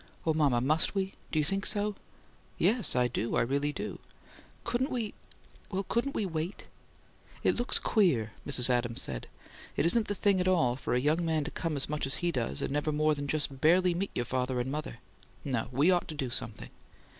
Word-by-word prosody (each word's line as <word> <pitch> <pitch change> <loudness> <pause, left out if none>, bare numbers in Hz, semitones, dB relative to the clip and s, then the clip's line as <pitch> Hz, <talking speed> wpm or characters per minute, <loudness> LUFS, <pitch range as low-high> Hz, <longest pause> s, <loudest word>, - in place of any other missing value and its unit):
"Oh, 160 - +3
mama, 145 -6 +3
must 155 +8 +2
we? 195 0 -1 0.2
Do - - -1
you 150 - +3
think 195 +4 -1
so?" 210 +1 +1 0.6
"Yes, 225 -2 +2
I 125 0 +3
do. 115 -1 -2
I - - +3
really 140 +4 0
do." - - -5 0.6
"Couldn't 245 +4 0
we 230 -5 -2 0.6
well, 195 0 -2
couldn't 240 +8 -1
we 210 - 0
wait?" 165 +1 -4 0.8
"It - - +3
looks 240 +1 +1
queer," 145 - +2
Mrs. 130 -3 +6
Adams 120 -2 0
said. - - -4 0.5
"It - - +1
isn't 215 +6 +3
the 205 - -2
thing 200 -2 +2
at 180 - 0
all 160 -10 +3
for 130 - -2
a - - +3
young 155 +6 +1
man 160 -2 +1
to 150 - -5
come 165 -2 -2
as 140 - 0
much 150 -2 -2
as 135 - +1
he 175 0 -1
does, 115 - -2
and - - -2
never 150 +1 0
more 155 +1 +2
than 145 -1 -4
just 140 -2 -1
barely 180 +3 +4
meet 195 +3 -2
your 120 - -1
father 125 +1 -1
and 125 +2 -2
mother. 150 +1 -4 0.5
No. 125 -5 -1
We 145 +8 +4
ought 175 -1 +1
to 155 - -6
do 130 -4 -3
something." - - -4
155 Hz, 210 wpm, -30 LUFS, 130-185 Hz, 0.8 s, Mrs